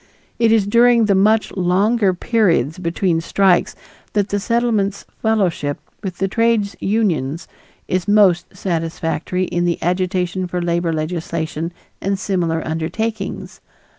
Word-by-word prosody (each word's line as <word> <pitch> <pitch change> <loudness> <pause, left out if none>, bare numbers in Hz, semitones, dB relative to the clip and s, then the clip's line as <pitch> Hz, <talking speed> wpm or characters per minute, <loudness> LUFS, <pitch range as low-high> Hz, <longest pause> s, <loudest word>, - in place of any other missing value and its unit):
It 230 -1 +4
is 220 -3 +4
during 235 +2 +4
the 205 - +3
much 215 +3 +3
longer 195 +3 +2
periods 180 - +1
between 170 -1 0
strikes 185 +1 +2 0.4
that 205 -1 +1
the 205 - 0
Settlement's 215 -3 0 0.2
fellowship 185 -10 0 0.2
with 190 0 -2
trades 230 -3 +1
unions 175 -8 -1 0.4
is 185 +1 -1
most 205 -4 +4
satisfactory 165 0 -2
in 175 -1 -1
the 170 -1 +1
agitation 180 +1 -1
for 180 0 -3
labor 170 -1 0
legislation 160 0 -3 0.3
and 195 0 0
similar 170 -4 -1
undertakings. 195 +7 -4
185 Hz, 120 wpm, -19 LUFS, 170-210 Hz, 0.4 s, It